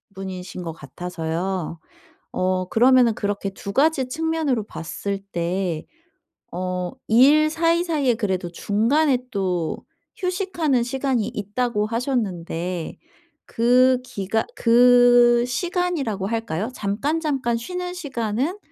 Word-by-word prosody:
분이신 185 -1 -6
것 165 - -4
같아서요. 165 +3 -4 0.5
어 185 0 0
그러면은 245 0 +5
그렇게 205 -1 -2
2 200 +1 -7
가지 275 0 +2
측면으로 315 -5 -1
봤을 200 +2 -5
때 175 -1 -2 0.7
어 180 -1 -2 0.2
"일 285 +7 +5
사이사이에 330 -4 +1
그래도 190 -6 -2
중간에 250 - +2
또 180 -5 -1 0.4
휴식하는 360 - 0
시간이 255 -3 -1
있다."고 210 0 -2
하셨는데 185 - -3 0.5
그 250 +2 +3
기간 210 -1 -2
그 245 0 +6
시간이라고 285 - -1
할까요? 225 -2 -2
잠깐잠깐 265 +3 -1
쉬는 360 +8 -5
시간은 270 - -2
230 Hz, 235 characters per minute, -23 LUFS, 190-275 Hz, 0.7 s, 그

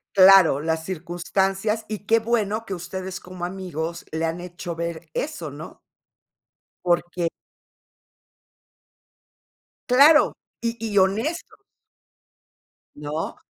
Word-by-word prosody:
Claro, 190 -6 +7
las 160 0 -1
circunstancias 190 +5 -1
y 215 -1 -4
qué 225 +2 +4
bueno 225 -1 -1
que 195 - -5
ustedes 185 +1 -6
como 180 -1 -7
amigos 170 -3 -5
le 160 +1 -1
han 165 +2 -2
hecho 175 -1 -6
ver 165 -1 -5
eso, 175 - -4
¿no? 150 +3 -10 1.0
Porque 175 0 +1 2.6
Claro, 290 +5 +6 0.3
y 230 0 -1 0.2
y 205 - +1
honesto. 220 - +1 1.4
¿No? 150 +2 -4
185 Hz, 100 wpm, -24 LUFS, 170-210 Hz, 2.6 s, Claro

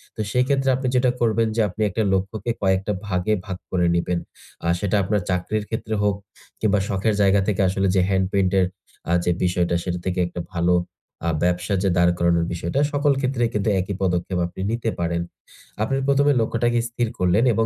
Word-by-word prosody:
তো 110 - -3
সেক্ষেত্রে 135 +2 +2
আপনি 130 0 -2
যেটা 125 0 +3
করবেন 115 -1 +2
যে 115 - +2
আপনি 100 +4 -7
একটা 105 +4 -1
লক্ষ্যকে 100 +5 -1
কয়েকটা 95 +1 +1
ভাগে 90 +2 0
ভাগ 95 -3 -5
করে 90 -2 +2
নিবেন। 85 0 0 0.5
আ - - 0
সেটা 100 0 0
আপনার 105 +2 0
চাকরির 100 +4 -1
ক্ষেত্রে 110 -1 -3
হোক, 100 -1 +2 0.4
কিংবা 105 -2 +2
শখের 100 +2 0
জায়গা 100 0 +4
থেকে 100 -2 +1
আসলে 95 +1 0
যে 95 - +4
হ্যান্ড 95 -1 +2
পেইন্ট 95 -2 +2
এর 95 - +4 0.4
আ - - +1
যে 90 - +2
বিষয়টা 90 -1 +1
সেটা 90 -1 -3
থেকে 90 0 -1
একটা 85 - -6
ভালো 85 0 +2 0.5
আ - - +3
ব্যবসা 90 +2 0
যে 100 - +3
দাঁড় 85 0 +5
করানোর 85 -1 +2
বিষয়টা, 85 +8 -2
সকল 145 0 +3
ক্ষেত্রেই 125 -3 0
কিন্তু 105 0 0
একই 95 +2 -3
পদক্ষেপ 90 0 0
আপনি 90 +2 -8
নিতে 115 0 -1
পারেন। 85 0 0 0.6
আপনি 125 +5 0
১ম 140 0 +3
এ - - +4
লক্ষ্যটাকে 120 +1 +1
স্থির 120 0 -1
করলেন 90 +6 +3
এবং 115 +1 +1
100 Hz, 195 wpm, -23 LUFS, 90-115 Hz, 0.6 s, দাঁড়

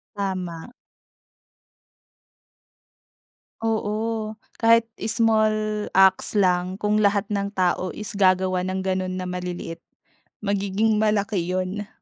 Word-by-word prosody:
Tama. 185 -2 -4 2.9
Oo, 220 0 -2 0.2
kahit 230 0 +4 0.2
small 215 -2 +1
acts 190 0 +4
lang. 185 -2 +1
Kung 210 0 +1
lahat 200 0 +2
ng 200 -1 -2
tao 185 -1 0
is 210 0 -7
gagawa 185 -1 +2
ng 185 +1 -2
ganun 185 -1 -2
na 185 - -4
maliliit, 180 -2 -5 0.6
magiging 200 +2 +1
malaki 210 -2 +1
'yon. 185 +4 -2
200 Hz, 95 wpm, -24 LUFS, 185-215 Hz, 2.9 s, kahit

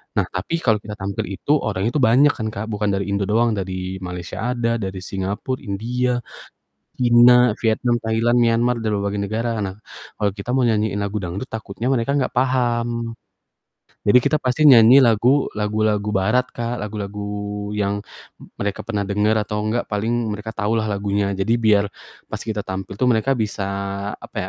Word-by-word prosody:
Nah, 100 - +3
tapi 130 - -3
kalau 110 -1 +3
kita 105 0 -8
tampil 100 +2 -4
itu, 100 +8 -3
orangnya 105 +1 -1
tuh 150 - 0
banyak 135 +4 +5
kan, 110 -5 -4
Kak, 110 0 -5
bukan 105 0 -1
dari 100 0 -1
Indo 100 -1 0
doang, 115 +3 +2
dari 95 -2 -4
Malaysia 90 +6 -4
ada, 115 -1 0
dari 95 -2 -5
Singapore, 100 +7 -3
India, 120 +4 -2 0.7
Cina, 125 0 +6
Vietnam, 120 +1 +1
Thailand, 115 +2 +1
Myanmar, 120 +1 +2
dan 110 -2 -1
berbagai 100 0 -2
negara. 115 +2 -2
Nah, 95 -2 -3 0.4
kalau 105 -1 0
kita 105 +5 -4
mau 130 - +2
nyanyiin 110 -3 +1
lagu 100 +1 -2
dangdut, 95 +6 -5
takutnya 110 +2 -4
mereka 135 +1 +1
enggak 140 -3 +1
paham. 120 -2 0 0.9
Jadi 105 +5 +6
kita 140 +4 +2
pasti 130 +4 +1
nyanyi 125 -2 +8
lagu 125 +2 +4
lagu-lagu 105 0 0
barat, 105 +6 +1
Kak, 120 +1 -4
lagu-lagu 105 0 -5
yang 100 0 -1 0.6
mereka 100 -1 -3
pernah 105 -3 -3
denger 105 +2 +1
atau 105 0 -3
enggak 110 +3 -1
paling 110 +1 -1
mereka 110 +2 -7
tahu 105 0 0
lah 110 -1 -1
lagunya, 100 0 -1
jadi 100 +4 +1
biar 105 -2 +4 0.4
pas - - -6
kita 105 -2 -4
tampil 95 +1 -5
tuh 130 - +1
mereka 125 +3 +2
bisa, 105 -3 -2 0.5
apa - - -12
110 Hz, 165 wpm, -21 LUFS, 100-120 Hz, 0.9 s, nyanyi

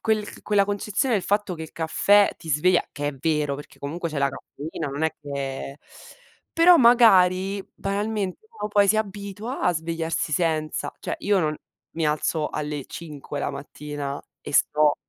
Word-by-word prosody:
quel 215 -2 -1
quella 205 -1 +3
concezione 210 +4 0
del 195 - +1
fatto 205 -2 0
che 160 - -7
il 160 - -9
caffè 195 +6 +3
ti 160 - -8
sveglia, 170 +5 +3
che 145 0 -2
è 145 - -4
vero, 150 0 0
perché 145 - -11
comunque 165 +4 -4
c'è 150 - -3
la 140 0 +3
caffeina 150 +3 -6
non 140 +3 -4
è 160 - +1
che 140 0 -5 0.8
però 350 +1 +8
magari, 195 - +5
banalmente, 205 - -3
uno 445 - -5
poi 205 -1 +4
si 215 - +4
abitua 205 +3 -4
a 180 - +3
svegliarsi 165 -1 -2
senza. 155 -1 0
Cioè - - -3
io 205 -1 +2
non 155 -3 0 0.4
mi 165 -1 -2
alzo 150 +1 0
alle 150 -2 -4
5 150 -3 -7
la - - -1
mattina 145 0 -6 0.2
e - - -8
sto 150 +1 +4
165 Hz, 165 wpm, -24 LUFS, 150-205 Hz, 0.8 s, però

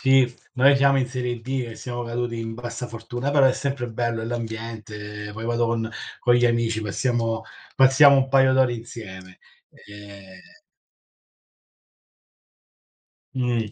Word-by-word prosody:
Sì, 135 -2 +4 0.2
noi 135 +2 +5
siamo 140 0 +4
in 130 - +1
serie 125 -2 -4
D 130 +1 -3
e - - -9
siamo 120 -1 -5
caduti 120 0 -3
in 115 0 -5
bassa 120 +1 -6
fortuna, 120 +3 -5
però 140 -2 +5
è 130 - +4
sempre 135 -2 -3
bello, 115 0 -2
è - - -3
l'ambiente, 110 -3 -6
poi 110 +2 -7
vado 120 0 +1
con 115 -1 -2 0.3
con 120 - +3
gli 120 0 +3
amici, 115 -2 0
passiamo 115 +1 -1 0.3
passiamo 135 +2 +7
un 135 -1 +2
paio 135 -1 +4
d'ore 130 -2 +3
insieme. 95 -6 -10 0.3
Ehm. 100 -2 -13 2.9
Mh. 120 -4 -1
120 Hz, 140 wpm, -23 LUFS, 115-130 Hz, 2.9 s, passiamo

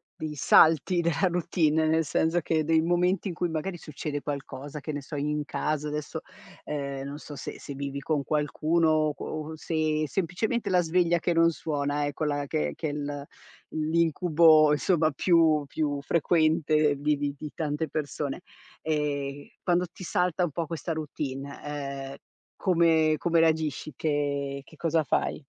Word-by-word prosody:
dei 155 -1 -5
salti 160 +4 +5
della 170 +3 +1
routine, 160 -3 +1
nel 160 0 +2
senso 160 +4 +1
che 160 0 0
dei 160 +1 +3
momenti 180 +3 +1
in 180 - -3
cui 175 +1 -1
magari 165 +3 -3
succede 150 -2 -5
qualcosa, 145 0 -6
che 155 +2 -5
ne 145 - -4
so, 145 +3 -8
in 150 +1 -1
casa, 150 0 -2
adesso, 150 -1 -4 0.4
ehm, 140 -2 -4
non 140 +1 -6
so 150 -1 -9
se - - -7
se 140 - -7
vivi 140 0 -4
con 145 0 -1
qualcuno 155 +3 +1
o 155 -1 +2
qu - - -9
o 155 0 -5
se 155 -1 -1
semplicemente 200 - -1
la 180 -1 +4
sveglia 170 0 +2
che 175 - 0
non 165 0 +5
suona, 145 -2 -1
ecco 145 +2 -2
la 145 -1 -1
che 75 - -1
che 155 - -3
l 145 -1 -4 0.5
l'incubo 160 -1 +4
insomma 155 +1 +2
più 160 -1 +3
più 145 -1 -1
frequente, 155 -2 +2
vivi 145 0 0
di 150 0 -7
tante 155 0 -2
persone. 145 +1 -3 0.4
Ehm, 145 -2 -2 0.2
quando 180 0 +2
ti - - -11
salta 180 0 0
un 160 - -5
po' 165 +2 -3
questa 165 +1 -3
routine, 140 -3 -5
ehm, 140 -2 -5 0.4
come 165 -4 +3
come 170 +1 +2
reagisci, 155 -2 +1
che 140 -2 -1
che 160 - -17
cosa 165 0 +1
fai? 145 - -1
155 Hz, 160 wpm, -27 LUFS, 145-165 Hz, 0.5 s, salti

